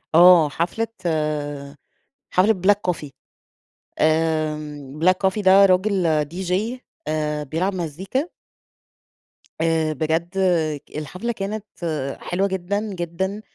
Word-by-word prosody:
آه 170 -3 +8
حفلة 180 +9 -1 0.2
آآ 145 -3 -2 0.6
حفلة 190 +4 +4
Black 205 -2 +3
Coffee 150 -3 -9 0.9
.آمم 155 -3 0
Black 185 - +6
Coffee 200 +3 -3
ده 195 +1 +7
راجل 180 -5 +2
DJ 180 +4 -3 0.5
آآ 150 -1 -1
بيلعب 175 +7 -1
مزيكا 190 - -3 1.3
آآ 160 -1 +1
بجد 160 +4 -1 0.7
الحفلة 180 +10 -4
كانت 210 0 -4 0.6
حلوة 195 +3 0
جدًا، 190 +2 -2
جدًا 190 +4 -3
170 Hz, 95 wpm, -22 LUFS, 155-190 Hz, 1.3 s, آه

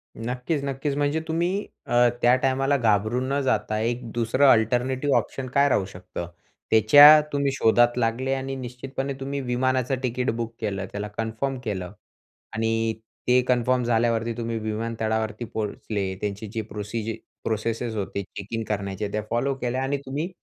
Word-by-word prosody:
नक्कीच, 125 +6 -3
नक्कीच. 140 +1 -2
म्हणजे 145 +2 +1
तुम्ही 175 +5 0 0.2
अ, 120 0 +4
त्या 120 +1 +6
टायमाला 135 +2 +1
घाबरून 115 +2 +1
न 140 - +1
जाता 110 -5 0
एक 120 +1 -2
दुसरं 120 +5 +2
अल्टरनेटिव्ह 125 +5 +2
ऑप्शन 135 -1 -3
काय 140 0 +4
राहू 100 -7 +2
शकतं. 90 -2 -7 0.4
त्याच्या 145 +8 +9
तुम्ही 140 -1 +1
शोधात 120 +1 +4
लागले 125 +3 0
आणि 135 0 -3
निश्चितपणे 130 +2 -5
तुम्ही 140 +1 -3
विमानाचं 130 +1 0
तिकीट 125 +1 -1
बुक 115 0 -4
केलं 100 -3 -2
त्याला 105 +1 -4
कन्फर्म 115 +5 -2
केलं. 95 -5 -4 0.6
आणि 115 0 0 0.3
ते 125 0 +5
कन्फर्म 125 0 +2
झाल्यावरती 115 0 +1
तुम्ही 115 -1 -2
विमानतळावरती 110 +1 -2
पोहोचले 105 -2 -3
त्यांची 105 +1 -3
जी 115 - -1
प्रोसीज 110 +1 -4 0.3
प्रोसेसेस 115 +1 -2
होते 100 -1 -3
चेक 100 0 -9
इन 115 0 -1
करण्याच्या 100 0 -2
त्या 105 - -1
फॉलो 120 +4 0
केल्या 130 0 -2
आणि 140 +2 0
तुम्ही, 145 +6 -3
120 Hz, 150 wpm, -25 LUFS, 110-135 Hz, 0.6 s, त्याच्या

